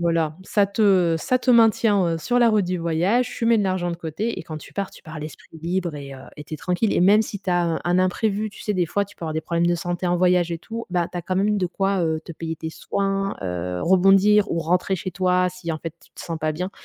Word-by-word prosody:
voilà, 165 -2 0
ça 205 +1 +2
te 195 -5 +3
ça 255 +10 +1
te 255 - +1
maintient, 225 -4 +4
heu, - - -3
sur 245 +9 0
la 240 -1 +5
route 215 -3 +3
du 180 0 -2
voyage, 175 +9 +1
tu - - -2
mets 230 -1 +4
de 205 - +1
l'argent 185 -2 -1
de 170 - -4
côté 175 +8 -3
et - - -6
quand 155 -1 -7
tu - - -14
pars, 200 -1 -3
tu - - -15
pars 155 0 -8
l'esprit 155 +1 -10
libre 170 -1 -2
et 140 -1 -8
heu - - -11 0.2
et 150 - -9
tu 155 - -7
es - - -5
tranquille. 180 +6 0
Et - - +2
même 205 +4 +5
si 205 -2 -7
tu 195 - -3
as 175 0 +2
un 165 -1 -1
un 175 +1 +2
imprévu, 205 +3 0
tu - - -12
sais, 210 - -1
des 175 -2 +1
fois 200 +5 0
tu 205 +1 -18
peux 170 - -7
avoir 155 - -3
des 160 - 0
problèmes 170 +1 0
de 175 - +2
santé 175 +1 -3
en 175 0 +2
voyage 180 -1 +2
et 165 - -3
tout, 230 +6 -7
bah, 175 -1 0
tu 180 - -5
as - - -5
quand 185 - -3
même 210 +2 +2
de 185 - 0
quoi, 195 +2 0
heu, 160 -1 -1
te - - -10
payer 165 0 -5
tes 160 +1 -5
soins, 195 +3 -2
heu, 90 -1 -3
rebondir 195 +3 +5
ou 170 - 0
rentrer 180 +4 +1
chez 185 - -5
toi 180 0 +2
si, 180 -2 -6
en 155 - -4
fait, 165 0 -7
tu - - -22
te - - -10
sens 165 -2 -5
pas 155 0 -1
bien. 180 +5 -4
180 Hz, 290 wpm, -23 LUFS, 165-200 Hz, 0.2 s, la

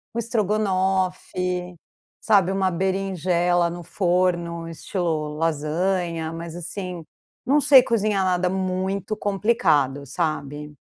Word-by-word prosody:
um - - -3
estrogonofe, 185 -4 -1 0.4
sabe, 195 -4 +3
uma 190 -1 +1
berinjela 180 -2 +1
no 175 +1 -7
forno 175 -2 0
estilo 160 -3 -3
lasanha, 165 +1 -1
mas 165 0 -7
assim, 175 0 -6 0.4
não 290 +3 +3
sei 270 -3 +8
cozinhar 210 -4 +1
nada 180 0 +1
muito 190 +2 -2
complicado, 165 - +1
sabe. 150 -1 -3
180 Hz, 100 wpm, -23 LUFS, 165-195 Hz, 0.4 s, sei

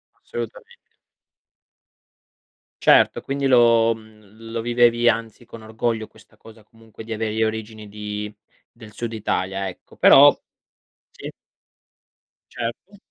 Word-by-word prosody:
Assolutamente. 485 -1 -9 1.9
Certo, - - +4
quindi 140 0 -2
lo 115 -2 +4
mhmm, 110 0 -16
lo 115 -1 -3
vivevi, 120 0 +3
anzi, 115 0 -3
con 115 -1 -12
orgoglio 110 0 -3
questa 110 0 -22
cosa 110 -1 -17
comunque 110 0 -15
di 115 - -11
avere 110 0 -2
le 110 0 0
origini 110 -1 -5
di 105 0 -6 0.4
del 110 -1 -15
Sud 115 0 -5
Italia, 95 -2 -2
ecco. 90 - -12
Però - - +8 0.8
sì? - - -9 1.2
Certo. 120 - -7
115 Hz, 115 wpm, -22 LUFS, 110-120 Hz, 1.9 s, Però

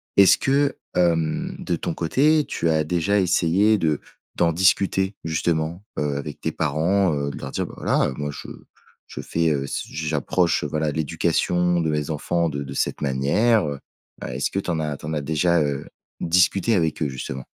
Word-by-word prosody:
est-ce 100 -2 +7
que 140 +1 +1 0.2
hem, 80 -3 +1
de 85 - -1
ton 85 - -3
côté, 145 - +2
tu 85 - -1
as 80 -1 +2
déjà 90 +5 +1
essayé 95 +4 +3
de 80 -5 0 0.4
d'en 85 -1 +2
discuter, 95 +2 +2
justement 80 +2 -1
heu, 75 -1 -1
avec 70 +1 -6
tes - - -2
parents? 80 +4 +1
Heu, 70 -1 -2
de - - -8
leur 70 - -6
dire: - - -2
«Bah - - -10
voilà, - - +1
heu - - -4
moi 75 +1 -3
je - - -9 0.6
je - - -9
fais, 85 0 0
heu, 70 -3 0
s 70 - -3
j 80 0 -5
j'approche, 80 +3 +1
voilà, 75 -1 -1
l'éducation 90 +3 +1
de 80 - 0
mes 75 0 -1
enfants 85 +3 0
de 70 -1 -4
de 70 0 -7
cette - - -2
manière, 75 - +2
heu». 70 -1 -4 0.4
Bah, 60 - -5
est-ce 65 - -1
que 100 - -1
tu 95 - -5
en 85 -2 0
as 75 -2 -2
tu - - -11
en 80 - -3
as 75 - -1
déjà 80 +3 +2
heu, 70 -2 -2 0.3
discuté 90 +6 +3
avec 80 -4 0
eux, 75 - +2
justement? 65 0 -6
80 Hz, 200 wpm, -23 LUFS, 75-90 Hz, 0.6 s, est-ce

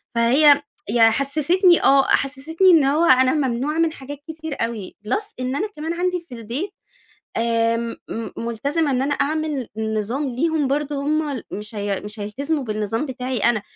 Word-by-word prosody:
فهي 280 +5 +5 0.3
ي 235 +2 +2
حسستني 315 - +3
آه 275 0 +5
حسستني 310 +7 +2
إن 325 -4 +6
هو 300 +5 +3
أنا 260 -1 +5
ممنوعة 280 +1 -1
من 330 -1 +3
حاجات 285 -1 -8
كتير 320 -1 -6
أوي 225 -5 -7
Plus 415 - -2
إن 255 +1 -2
أنا 410 +8 -1
كمان 320 +2 -3
عندي 360 0 -1
في 335 -7 -11
البيت 240 - -4 0.7
آآ 230 0 +1 0.3
م 225 0 -5
ملتزمة 280 +7 -1
إن 255 -1 +1
أنا 285 +2 0
أعمل 295 -3 -1
نظام 220 +5 -2
ليهم 315 0 +1
برضو 285 0 -1
هُم 295 -3 -1
مش 210 +2 -7
هي 200 -1 -2
مش 210 +1 -9
هيلتزموا 275 +9 -2
بالنظام 215 +3 -2
بتاعي 255 -1 -4
أنا، 215 0 +2
275 Hz, 160 wpm, -22 LUFS, 235-310 Hz, 0.7 s, إن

